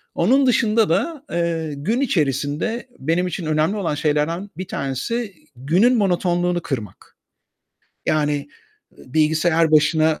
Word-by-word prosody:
Onun 260 Hz, +11 st, +3 dB
dışında 225 Hz, -3 st, +3 dB
da, 295 Hz, -, -1 dB
eee, 165 Hz, -2 st, -1 dB
gün 195 Hz, -, -1 dB
içerisinde 155 Hz, -, -1 dB
benim 165 Hz, +6 st, 0 dB
için 180 Hz, 0 st, -4 dB
önemli 155 Hz, +6 st, +1 dB
olan 175 Hz, -7 st, -1 dB
şeylerden 155 Hz, +6 st, -1 dB
bir 185 Hz, 0 st, -5 dB
tanesi, 200 Hz, -, -3 dB, 0.2 s
günün 180 Hz, -, +3 dB
monotonluğunu 175 Hz, -3 st, +1 dB
kırmak. 110 Hz, -, -7 dB, 0.9 s
Yani, 145 Hz, -2 st, 0 dB, 0.5 s
ııı, 130 Hz, -, -16 dB
bilgisayar 160 Hz, +1 st, +2 dB
başına 155 Hz, +1 st, +3 dB
165 Hz, 120 wpm, -21 LUFS, 150-200 Hz, 0.9 s, Onun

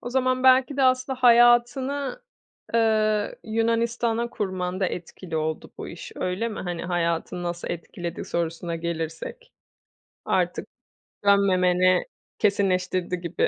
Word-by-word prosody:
O 245 Hz, -, -6 dB
zaman 255 Hz, 0 st, +1 dB
belki 260 Hz, +1 st, +5 dB
de 275 Hz, -, +2 dB
aslında 255 Hz, 0 st, +2 dB
hayatını, 250 Hz, -, +4 dB, 0.5 s
ııı, 215 Hz, -2 st, +2 dB
Yunanistan'a 230 Hz, +1 st, 0 dB
kurmanda 185 Hz, -1 st, -2 dB
etkili 165 Hz, -1 st, -6 dB
oldu 155 Hz, 0 st, -3 dB
bu -, -, -6 dB
iş, 170 Hz, -, -9 dB
öyle 185 Hz, +6 st, -1 dB
mi? 215 Hz, -, -6 dB
Hani, 175 Hz, -2 st, -4 dB
hayatını 175 Hz, 0 st, -1 dB
nasıl 175 Hz, 0 st, -4 dB
etkiledi 170 Hz, 0 st, -5 dB
sorusuna 170 Hz, 0 st, -3 dB
gelirsek. 165 Hz, -, -5 dB, 0.7 s
Artık -, -, 0 dB, 0.6 s
dönmemeni 185 Hz, -2 st, +4 dB, 0.3 s
kesinleştirdi 185 Hz, -3 st, +1 dB
gibi. 170 Hz, 0 st, 0 dB
200 Hz, 110 wpm, -25 LUFS, 175-240 Hz, 0.7 s, belki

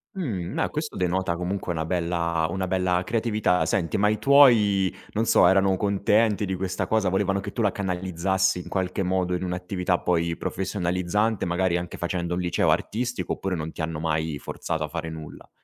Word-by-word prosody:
Uhm. 100 Hz, -, -3 dB
No, -, -, 0 dB
questo 150 Hz, 0 st, -4 dB
denota 90 Hz, -1 st, 0 dB
comunque 90 Hz, +1 st, -3 dB
una 80 Hz, -1 st, -2 dB
bella 85 Hz, -2 st, 0 dB
una 95 Hz, +1 st, -2 dB
bella 90 Hz, -1 st, +1 dB
creatività. 110 Hz, -5 st, +1 dB
Senti, 85 Hz, -5 st, 0 dB
ma 105 Hz, +1 st, +3 dB
i 110 Hz, -, 0 dB
tuoi, 110 Hz, -9 st, +5 dB, 0.2 s
non 110 Hz, +2 st, 0 dB
so, 90 Hz, -, +5 dB
erano 95 Hz, +1 st, +4 dB
contenti 105 Hz, +2 st, +2 dB
di 95 Hz, -, -3 dB
questa 95 Hz, 0 st, -2 dB
cosa? 110 Hz, -4 st, +1 dB
Volevano 100 Hz, +1 st, +1 dB
che -, -, -6 dB
tu 115 Hz, -, -2 dB
la 105 Hz, -, +3 dB
canalizzassi 95 Hz, 0 st, 0 dB
in -, -, -8 dB
qualche 95 Hz, 0 st, -2 dB
modo 90 Hz, -1 st, 0 dB
in 90 Hz, -, -1 dB
un'attività 90 Hz, 0 st, -1 dB
poi 85 Hz, -1 st, 0 dB
professionalizzante, 95 Hz, +3 st, -1 dB
magari 90 Hz, 0 st, +1 dB
anche 85 Hz, 0 st, -6 dB
facendo 85 Hz, 0 st, -2 dB
un 90 Hz, -, -2 dB
liceo 90 Hz, -1 st, +1 dB
artistico, 120 Hz, +2 st, -1 dB
oppure 95 Hz, -1 st, -3 dB
non 80 Hz, 0 st, -4 dB
ti -, -, -7 dB
hanno 80 Hz, -1 st, -3 dB
mai 80 Hz, -1 st, -1 dB
forzato 80 Hz, +2 st, -4 dB
a -, -, -2 dB
fare 80 Hz, +1 st, -5 dB
nulla? 80 Hz, -2 st, -10 dB
90 Hz, 185 wpm, -25 LUFS, 85-100 Hz, 0.2 s, tuoi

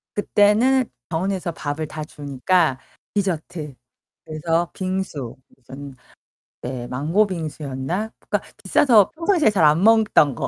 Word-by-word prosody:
그때는 215 Hz, +6 st, +3 dB, 0.2 s
병원에서 180 Hz, +1 st, -2 dB
밥을 150 Hz, 0 st, -4 dB
다 155 Hz, 0 st, -6 dB
주니까 145 Hz, +1 st, 0 dB, 0.3 s
디저트. 170 Hz, -6 st, -3 dB, 0.5 s
그래서 165 Hz, +2 st, -1 dB
빙수 185 Hz, -10 st, -4 dB, 0.2 s
무슨 135 Hz, +1 st, -11 dB, 0.7 s
네 125 Hz, -1 st, -5 dB
망고 160 Hz, +11 st, +1 dB
빙수였나? 160 Hz, +3 st, -4 dB
그니까 -, -, -2 dB, 0.2 s
비싸서 225 Hz, -8 st, +4 dB
평상시에 335 Hz, -, +2 dB
잘 195 Hz, -6 st, +1 dB
안 155 Hz, +4 st, +4 dB
먹던 215 Hz, -, +4 dB
거. -, -, -3 dB
165 Hz, 260 characters per minute, -22 LUFS, 145-205 Hz, 0.7 s, 비싸서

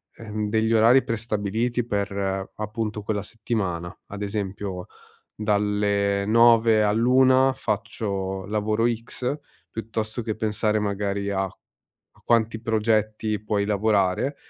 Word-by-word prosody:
ehm, 105 Hz, -2 st, -4 dB
degli 110 Hz, +1 st, +1 dB
orari 115 Hz, +4 st, +6 dB
prestabiliti 115 Hz, +2 st, -1 dB
per 100 Hz, -2 st, -2 dB
appunto 105 Hz, 0 st, -4 dB
quella 105 Hz, -1 st, -1 dB
settimana, 95 Hz, -6 st, -3 dB
ad 100 Hz, 0 st, -8 dB
esempio 100 Hz, -2 st, -4 dB, 0.5 s
dalle 100 Hz, -1 st, +1 dB
9 115 Hz, 0 st, +5 dB
all'1 130 Hz, +5 st, +4 dB
faccio 100 Hz, -4 st, -3 dB
lavoro 105 Hz, +2 st, 0 dB
X, 125 Hz, +4 st, -4 dB, 0.3 s
piuttosto 110 Hz, +1 st, -4 dB
che 110 Hz, -1 st, -2 dB
pensare 110 Hz, -1 st, 0 dB
magari 100 Hz, -1 st, -2 dB
a 95 Hz, -1 st, 0 dB
a 95 Hz, -, -18 dB, 0.4 s
quanti 115 Hz, -1 st, +2 dB
progetti 110 Hz, -1 st, 0 dB
puoi 105 Hz, -1 st, 0 dB
lavorare, 105 Hz, +5 st, +1 dB
105 Hz, 110 wpm, -24 LUFS, 100-115 Hz, 0.5 s, orari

